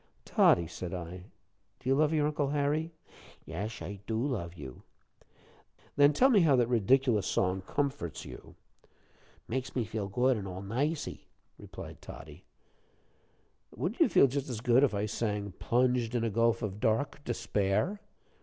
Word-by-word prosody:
"Toddie," 85 - +4
said 90 +1 -6
I, 90 +1 -7 0.5
"do - - -10
you 135 - +4
love 150 +2 +3
your 155 -2 +2
Uncle 150 -1 0
Harry?" 150 +3 0 0.6
"Esh, 105 +6 -5
I 100 0 -6
do 110 - -1
love 110 -10 -2
you." 65 -6 -9 1.1
"Then 145 0 +6
tell 260 - +4
me 215 - +6
how 155 -6 +5
that 125 -2 +3
ridiculous 120 -1 +2
song 95 0 0
comforts 140 - -2
you?" - - -11 0.9
"Makes 130 +2 -3
me 120 -3 0
feel 105 -2 -4
good, 125 +5 +2
an' 100 -2 -5
all 95 +1 -6
nicey," 145 +10 -2 0.3
replied - - -10
Toddie. - - -11 1.3
"Wouldn't - - -3
you - - +6
feel - - +6
just 140 +1 -2
as 120 -4 -3
good 120 +3 +4
if 125 -7 +2
I 100 +1 0
sang, 105 -2 -2
'Plunged 125 -1 +1
in 120 - +1
a 115 - 0
gulf 115 +2 +2
of 105 -1 -4
dark 115 +7 0
despair?'" 110 - 0
115 Hz, 155 wpm, -30 LUFS, 100-140 Hz, 1.3 s, Then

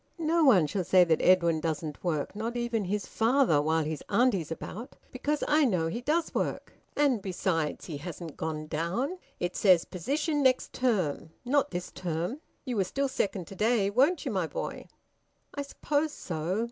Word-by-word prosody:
"No 330 0 +2
one 210 - +6
shall 185 +5 -2
say 180 +1 +5
that 165 -2 +2
Edwin 170 -3 +4
doesn't 155 -1 -4
work, 160 -1 -2
not 230 +3 -3
even 235 -3 -1
his 205 +2 -2
father, 230 - +3
while 160 +2 +1
his 155 -1 -4
auntie's 200 - +2
about! 220 - -7 0.2
Because 290 +4 -1
I 305 +1 +4
know 180 - +1
he 235 +9 -4
does 315 +5 0
work! - - -2 0.2
And 280 -7 +2
besides, 175 -5 -1
he 155 -5 -5
hasn't 165 0 -7
gone 155 -1 -4
down. 175 - -2 0.2
It 175 0 -2
says, 185 -5 +5
`position 290 - -2
next 260 -2 +2
term' 190 - 0 0.2
not 285 +3 +2
this 175 0 -5
term. 175 - -3 0.3
You 250 -4 -2
were 195 - +3
still 275 +9 -1
second 195 -8 -2
to 195 - -10
day, 215 -1 +2
weren't 285 - +3
you, 265 - -1
my 185 -5 0
boy?" - - -5 0.7
"I 285 - -3
suppose 290 +2 -1
so. 175 - -3
195 Hz, 175 wpm, -29 LUFS, 165-260 Hz, 0.7 s, one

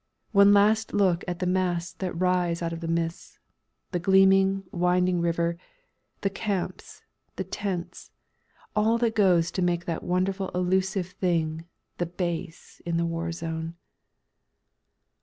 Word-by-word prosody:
One 200 -1 +6
last 210 +2 +3
look 190 -4 +2
at 175 -1 -3
the 180 - -2
masts 180 -1 0
that 180 -3 -3
rise 180 -2 +1
out 165 0 -2
of 165 - -5
the 165 - -5
mists, 165 0 -3 0.5
the 175 - -1
gleaming, 195 +1 +4
winding 180 -1 +2
river, 170 0 0 0.6
the 195 - +1
camps, 195 -2 -4 0.3
the - - -3
tents, 180 -4 -5 0.7
all 220 +2 +3
that 230 -1 +1
goes 180 -6 +3
to 185 - -2
make 175 -1 0
that 165 -2 -3
wonderful 190 +2 -1
elusive 185 +1 +1
thing 165 -3 -1 0.3
"The 175 - 0
Base" 170 -1 -5
in 170 -1 -1
the 170 - +1
war 165 0 -2
zone. 165 0 -5
180 Hz, 140 wpm, -26 LUFS, 170-195 Hz, 0.7 s, One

